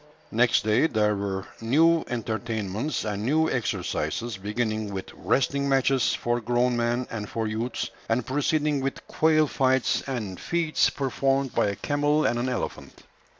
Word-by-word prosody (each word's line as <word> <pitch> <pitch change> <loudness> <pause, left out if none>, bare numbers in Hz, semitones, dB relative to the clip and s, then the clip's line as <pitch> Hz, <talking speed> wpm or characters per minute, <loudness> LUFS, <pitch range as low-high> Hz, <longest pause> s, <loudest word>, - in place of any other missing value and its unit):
Next 120 0 +3
day 110 +8 +3
there 105 -5 +1
were 95 -1 -3 0.2
new 160 +8 +4
entertainments 110 +2 -3
and 105 -1 -3
new 155 +6 +2
exercises; 120 -2 -2
beginning 110 +1 -2
with 95 -1 -6
wrestling 140 +1 0
matches 135 -2 +2
for 120 0 -1
grown 120 +2 +1
men 120 +1 0
and 105 -3 -5
for 115 -1 -2
youths, 110 +3 -3 0.2
and 115 +1 +1
proceeding 145 +2 +1
with 135 0 -4
quail 155 -1 +3
fights, 130 -2 +1
and 110 -9 -4
feats 170 -3 +1
performed 135 0 0
by - - +2
a 100 - -1
camel 145 +5 +1
and 120 - +1
an 125 +2 -1
elephant. 125 - -5
120 Hz, 150 wpm, -26 LUFS, 110-140 Hz, 0.2 s, new